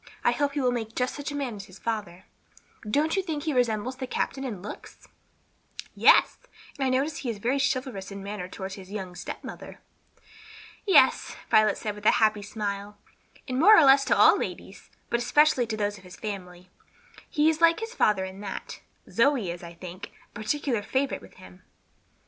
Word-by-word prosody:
I -, -, +4 dB
hope 285 Hz, -1 st, 0 dB
he 290 Hz, -, -1 dB
will 250 Hz, -1 st, +2 dB
make 225 Hz, -2 st, -4 dB
just 250 Hz, 0 st, 0 dB
such 290 Hz, 0 st, -5 dB
a -, -, -5 dB
man 270 Hz, -6 st, -3 dB
as 200 Hz, -, -8 dB
his 185 Hz, -1 st, -15 dB
father. 205 Hz, -5 st, -4 dB, 0.6 s
Don't 305 Hz, +8 st, +1 dB
you 385 Hz, -, +2 dB
think 315 Hz, -6 st, -4 dB
he 310 Hz, -, -1 dB
resembles 245 Hz, 0 st, 0 dB
the 260 Hz, -1 st, -5 dB
captain 270 Hz, +2 st, -2 dB
in 230 Hz, -8 st, -4 dB
looks?" 210 Hz, -, -10 dB, 0.9 s
"Yes, -, -, +5 dB, 0.4 s
and 275 Hz, -, -3 dB
I 265 Hz, -, +2 dB
notice 275 Hz, +4 st, 0 dB
he 255 Hz, -, -4 dB
is 225 Hz, -, -3 dB
very 245 Hz, +7 st, 0 dB
chivalrous 255 Hz, -7 st, -2 dB
in 200 Hz, -, -8 dB
his 195 Hz, -, -8 dB
manner 200 Hz, -2 st, -5 dB
toward 190 Hz, 0 st, -7 dB
his 190 Hz, -1 st, -10 dB
young 190 Hz, -4 st, -5 dB
stepmother." 175 Hz, -, -8 dB, 1.1 s
"Yes," 390 Hz, -, +4 dB, 0.2 s
Violet 215 Hz, -1 st, +4 dB
said, 210 Hz, -, -4 dB
with 210 Hz, +1 st, -4 dB
a -, -, +7 dB
happy 215 Hz, -1 st, +2 dB
smile, 205 Hz, 0 st, -5 dB, 0.5 s
"and 255 Hz, -1 st, -2 dB
more 420 Hz, +7 st, +8 dB
or -, -, +7 dB
less 275 Hz, 0 st, +7 dB
to -, -, +2 dB
all -, -, +6 dB
ladies; -, -, -7 dB, 0.2 s
but 235 Hz, -, +2 dB
especially 270 Hz, +1 st, +3 dB
those 210 Hz, -2 st, -2 dB
of -, -, -19 dB
this 180 Hz, 0 st, -12 dB
family. 180 Hz, -4 st, -7 dB, 0.6 s
He 305 Hz, -2 st, +2 dB
is 320 Hz, 0 st, +1 dB
like 335 Hz, +2 st, +5 dB
his 450 Hz, +1 st, -6 dB
father 205 Hz, -, +2 dB
in 190 Hz, +1 st, -9 dB
that. 200 Hz, -2 st, -6 dB, 0.3 s
Zoe 230 Hz, -7 st, +2 dB
is, 170 Hz, -, -8 dB
I 170 Hz, -1 st, -10 dB
think, 180 Hz, +3 st, -9 dB, 0.2 s
a -, -, -40 dB
particular 235 Hz, +2 st, -1 dB
favorite 265 Hz, +6 st, -1 dB
with 95 Hz, -, -16 dB
him." 90 Hz, 0 st, -15 dB
220 Hz, 195 wpm, -27 LUFS, 200-275 Hz, 1.1 s, more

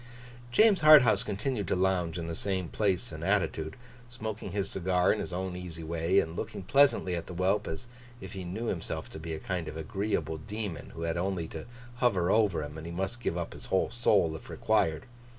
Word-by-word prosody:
James 210 Hz, -, +5 dB
Harthouse 150 Hz, -7 st, +8 dB
continued 105 Hz, 0 st, -2 dB
to -, -, +1 dB
lounge 90 Hz, -2 st, +1 dB
in 85 Hz, -, -3 dB
the 85 Hz, -, -4 dB
same 95 Hz, -1 st, -2 dB
place 95 Hz, -5 st, 0 dB
and -, -, -7 dB
attitude, 80 Hz, 0 st, 0 dB, 0.3 s
smoking 110 Hz, -3 st, -5 dB
his 100 Hz, 0 st, -1 dB
cigar 90 Hz, -1 st, +2 dB
in 105 Hz, -, -3 dB
his -, -, -4 dB
own 90 Hz, 0 st, -3 dB
easy 85 Hz, -2 st, -6 dB
way, 85 Hz, +4 st, +2 dB
and 80 Hz, -2 st, -2 dB
looking 110 Hz, 0 st, -5 dB
pleasantly 130 Hz, -6 st, +4 dB
at 85 Hz, -, -5 dB
the 90 Hz, -, -7 dB
whelp, 95 Hz, +4 st, +1 dB
as 80 Hz, -, -5 dB, 0.3 s
if 95 Hz, 0 st, -9 dB
he 95 Hz, -2 st, -5 dB
knew 95 Hz, +7 st, -4 dB
himself 90 Hz, -7 st, -3 dB
to -, -, -8 dB
be 80 Hz, +1 st, -5 dB
a -, -, -6 dB
kind 90 Hz, -3 st, -3 dB
of 80 Hz, -, -6 dB
agreeable 80 Hz, -2 st, -2 dB
demon 105 Hz, -1 st, -5 dB
who 85 Hz, -, -5 dB
had 85 Hz, 0 st, -1 dB
only 90 Hz, -2 st, -1 dB
to 80 Hz, +4 st, -8 dB, 0.3 s
hover 95 Hz, -8 st, +2 dB
over 100 Hz, -8 st, +3 dB
him, 75 Hz, +2 st, -7 dB
and 80 Hz, -, -8 dB
he -, -, -5 dB
must 95 Hz, +7 st, -3 dB
give 85 Hz, -, -1 dB
up 85 Hz, -, -4 dB
his -, -, -9 dB
whole 95 Hz, -, +1 dB
soul 100 Hz, -9 st, +3 dB
if -, -, -10 dB
required. 80 Hz, +3 st, +1 dB
95 Hz, 210 wpm, -30 LUFS, 85-105 Hz, 0.3 s, Harthouse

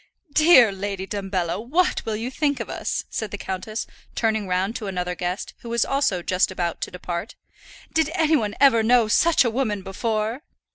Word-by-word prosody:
"Dear 305 Hz, -9 st, +7 dB
Lady 195 Hz, 0 st, -4 dB
Dumbello, 195 Hz, -4 st, -2 dB
what 335 Hz, +10 st, +1 dB
will 220 Hz, -, -1 dB
you 230 Hz, +4 st, -4 dB
think 285 Hz, 0 st, 0 dB
of -, -, -5 dB
us?" -, -, -3 dB
said 220 Hz, -, -3 dB
the 205 Hz, -, -5 dB
countess, 195 Hz, +4 st, -4 dB, 0.3 s
turning 220 Hz, -3 st, 0 dB
round 185 Hz, +4 st, 0 dB
to 215 Hz, -, -6 dB
another 180 Hz, -2 st, -2 dB
guest, 180 Hz, +2 st, -4 dB
who 235 Hz, -, -9 dB
was 235 Hz, -1 st, +1 dB
also 265 Hz, -11 st, 0 dB
just 185 Hz, +2 st, +2 dB
about 175 Hz, -3 st, -3 dB
to -, -, -2 dB
depart. 175 Hz, +2 st, -5 dB, 0.6 s
"Did 320 Hz, -2 st, +2 dB
any 320 Hz, -2 st, +3 dB
one 215 Hz, -7 st, -1 dB
ever 265 Hz, -5 st, +6 dB
know 235 Hz, 0 st, +4 dB
such 320 Hz, +5 st, +4 dB
a 235 Hz, -, +1 dB
woman 220 Hz, -5 st, -1 dB
before?" 215 Hz, +5 st, -2 dB
215 Hz, 185 wpm, -23 LUFS, 190-250 Hz, 0.6 s, Dear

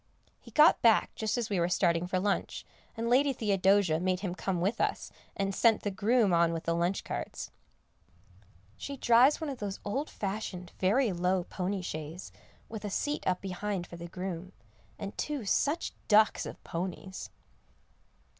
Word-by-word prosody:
He -, -, -15 dB
got 305 Hz, +1 st, +6 dB
back 230 Hz, -2 st, +4 dB
just 220 Hz, +2 st, -2 dB
as 230 Hz, -3 st, -2 dB
we 195 Hz, -, +1 dB
were 170 Hz, +1 st, +1 dB
starting 170 Hz, -1 st, +2 dB
for 185 Hz, -, 0 dB
lunch, 200 Hz, +1 st, -1 dB, 0.3 s
and 230 Hz, +1 st, -2 dB
Lady 270 Hz, +3 st, +4 dB
Theodosia 195 Hz, -6 st, +2 dB
made 185 Hz, +1 st, 0 dB
him 185 Hz, -4 st, -2 dB
come 185 Hz, -1 st, -2 dB
with 200 Hz, +7 st, 0 dB
us, -, -, -1 dB, 0.3 s
and 195 Hz, 0 st, -1 dB
sent 225 Hz, +2 st, +3 dB
the 205 Hz, -, -1 dB
groom 210 Hz, 0 st, +2 dB
on 170 Hz, 0 st, +3 dB
with 165 Hz, 0 st, -4 dB
the 165 Hz, -, 0 dB
lunch 175 Hz, +3 st, 0 dB
carts. -, -, -5 dB, 1.3 s
She 280 Hz, 0 st, -6 dB
drives 245 Hz, +4 st, +5 dB
one 315 Hz, -3 st, -3 dB
of 265 Hz, -, -7 dB
those 200 Hz, -2 st, -4 dB
old 270 Hz, +9 st, -2 dB
fashioned, 190 Hz, -3 st, -5 dB
very 215 Hz, +5 st, +3 dB
low 180 Hz, +1 st, +1 dB
pony 185 Hz, +2 st, -3 dB
shays, 155 Hz, +2 st, -6 dB, 0.4 s
with 220 Hz, -2 st, -7 dB
a 205 Hz, -, -3 dB
seat 290 Hz, +9 st, -2 dB
up 185 Hz, -1 st, +1 dB
behind 195 Hz, 0 st, -3 dB
for 170 Hz, -, -11 dB
the 170 Hz, 0 st, -7 dB
groom, 185 Hz, 0 st, -6 dB, 0.4 s
and 200 Hz, -, -6 dB
two 290 Hz, -7 st, -2 dB
such 290 Hz, -, 0 dB
ducks 215 Hz, 0 st, +4 dB
of -, -, -10 dB
ponies. 185 Hz, +2 st, -5 dB
195 Hz, 170 wpm, -30 LUFS, 180-225 Hz, 1.3 s, got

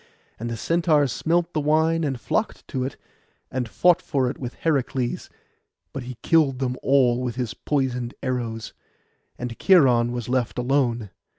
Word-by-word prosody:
And 120 Hz, +2 st, -4 dB
the 115 Hz, -, -4 dB
Centaurs 155 Hz, -1 st, +2 dB
smelt 170 Hz, +5 st, 0 dB
the 155 Hz, -, 0 dB
wine, 160 Hz, +2 st, +2 dB
and 135 Hz, -5 st, -2 dB
flocked 220 Hz, -, -2 dB
to 130 Hz, -2 st, -2 dB
it, 130 Hz, -, -5 dB, 0.5 s
and 125 Hz, -3 st, -2 dB
fought 180 Hz, +5 st, +3 dB
for 130 Hz, -5 st, 0 dB
it -, -, -11 dB
with 125 Hz, -2 st, -6 dB
Heracles; 135 Hz, -5 st, -1 dB, 0.6 s
but 135 Hz, -, -4 dB
he 125 Hz, -1 st, -8 dB
killed 155 Hz, -6 st, +3 dB
them 125 Hz, -1 st, -1 dB
all 125 Hz, -3 st, +3 dB
with 125 Hz, -3 st, -3 dB
his 125 Hz, -4 st, -3 dB
poisoned 125 Hz, -2 st, -2 dB
arrows, 115 Hz, -3 st, -3 dB, 0.6 s
and 120 Hz, -1 st, -5 dB
Cheiron 125 Hz, -11 st, +5 dB
was 120 Hz, -2 st, -4 dB
left 125 Hz, -2 st, -1 dB
alone. 120 Hz, -5 st, 0 dB
130 Hz, 160 wpm, -24 LUFS, 120-150 Hz, 0.6 s, Cheiron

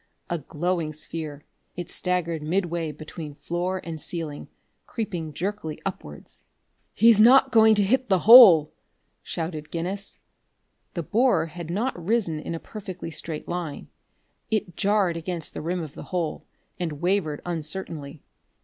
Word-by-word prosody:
A 170 Hz, -, 0 dB
glowing 165 Hz, +2 st, -2 dB
sphere, 155 Hz, -1 st, -7 dB, 0.3 s
it 175 Hz, 0 st, -6 dB
staggered 170 Hz, -3 st, -1 dB
midway 170 Hz, 0 st, -1 dB
between 150 Hz, 0 st, -9 dB
floor 175 Hz, +4 st, -2 dB
and 160 Hz, -2 st, -6 dB
ceiling, 160 Hz, -4 st, -5 dB, 0.4 s
creeping 180 Hz, -9 st, -4 dB
jerkily 175 Hz, -2 st, -4 dB
upwards. 75 Hz, -, -7 dB, 0.5 s
"He's 225 Hz, 0 st, +6 dB
not 265 Hz, +3 st, +7 dB
going 220 Hz, -2 st, +6 dB
to 205 Hz, -, +3 dB
hit 255 Hz, +4 st, +1 dB
the 190 Hz, -2 st, +2 dB
hole!" 205 Hz, -10 st, +10 dB, 0.5 s
shouted 160 Hz, -2 st, -5 dB
Guinness. 185 Hz, +5 st, -4 dB, 0.8 s
The 170 Hz, -, -2 dB
borer 240 Hz, -, +2 dB
had 165 Hz, 0 st, -8 dB
not 200 Hz, 0 st, -2 dB
risen 190 Hz, -6 st, 0 dB
in 165 Hz, -, -5 dB
a -, -, -5 dB
perfectly 185 Hz, -5 st, -8 dB
straight 155 Hz, 0 st, -6 dB
line; 175 Hz, -4 st, -5 dB, 0.6 s
it 210 Hz, -6 st, -1 dB
jarred 195 Hz, -4 st, +1 dB
against 165 Hz, -1 st, -2 dB
the -, -, -5 dB
rim 175 Hz, +2 st, -2 dB
of 155 Hz, -2 st, -9 dB
the -, -, -9 dB
hole, 175 Hz, -4 st, -3 dB, 0.3 s
and 170 Hz, -3 st, -2 dB
wavered 165 Hz, -1 st, -1 dB
uncertainly. 160 Hz, -3 st, -5 dB
175 Hz, 140 wpm, -25 LUFS, 155-195 Hz, 0.8 s, hole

